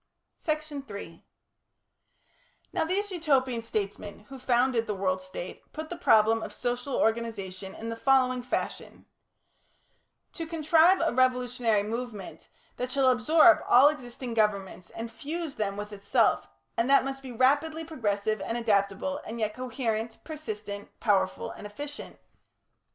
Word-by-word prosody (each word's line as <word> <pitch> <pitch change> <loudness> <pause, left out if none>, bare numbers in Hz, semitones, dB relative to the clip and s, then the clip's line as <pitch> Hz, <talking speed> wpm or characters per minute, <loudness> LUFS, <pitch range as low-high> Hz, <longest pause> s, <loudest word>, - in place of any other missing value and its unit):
Section 305 -3 -2
3 205 -7 -9 1.5
Now - - +1
these 400 +4 -1
Utopian 270 -8 +1
statesmen 205 -2 -4
who 270 -1 -9
founded 245 -2 +2
the 210 - -2
World 185 -1 0
State 185 -1 -7
put 315 +1 -6
the - - -2
problem 225 -8 +4
of - - -7
social 245 +2 -2
organisation 200 -4 -1
in 225 - -6
the 230 - -3
following 255 0 +3
fashion: 250 - -4 1.3
To 330 - -5
contrive 330 +3 +4
a 330 - +1
revolutionary 250 -4 +2
movement 225 -2 -6 0.3
that 250 0 -2
shall 265 -1 +4
absorb 315 +8 +6
all 260 +4 +8
existing 250 -4 -6
governments 200 -4 0
and 230 0 -6
fuse 310 +5 -5
them 200 -4 -2
with 210 0 -6
itself, 200 - +2 0.3
and 235 +3 +1
that 275 -1 +6
must 270 0 -4
be 265 -2 -8
rapidly 290 +6 +2
progressive 215 -8 -1
and 230 - -2
adaptable, 210 +4 0
and 230 +2 -6
yet 215 -1 0
coherent, 230 -2 -3
persistent, 210 -10 -6
powerful, 190 -4 +1
and 210 - -8
efficient. 290 +8 -8
240 Hz, 135 wpm, -28 LUFS, 210-280 Hz, 1.5 s, all